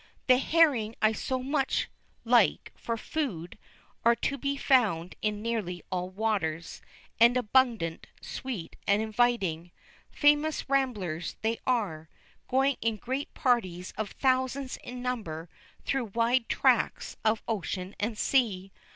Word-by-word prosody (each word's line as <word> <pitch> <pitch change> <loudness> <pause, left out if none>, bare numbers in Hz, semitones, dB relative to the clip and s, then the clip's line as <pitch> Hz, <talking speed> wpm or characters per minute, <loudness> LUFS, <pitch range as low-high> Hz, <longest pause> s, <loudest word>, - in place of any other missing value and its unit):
The 255 -1 +5
herring 270 -9 +3
I 215 - +4
so 255 +3 -3
much 275 0 0 0.4
like 235 -3 +3
for 230 -1 -3
food 215 - -4 0.4
are 235 0 +5
to 280 - -1
be 280 +1 -2
found 210 -12 +2
in 210 0 -1
nearly 210 -7 -3
all 180 0 -2
waters, 185 -6 -2 0.4
and 235 +2 +6
abundant, 230 -8 +1
sweet, 235 -11 -6
and 200 +1 +4
inviting. 215 -7 0 0.4
Famous 295 +1 +2
ramblers 215 - -1
they 225 +1 0
are, 185 -11 -1 0.4
going 270 +1 +2
in 230 -1 +1
great 260 +6 -4
parties 190 - 0
of 215 -2 -3
thousands 260 0 0
in 245 0 -8
number, 180 -10 -4 0.4
through 270 -3 0
wide 230 +3 +1
tracts - - +2
of 220 0 +1
ocean 190 -3 -3
and 215 +1 -2
sea. 200 -9 +1
230 Hz, 125 wpm, -29 LUFS, 190-260 Hz, 0.4 s, and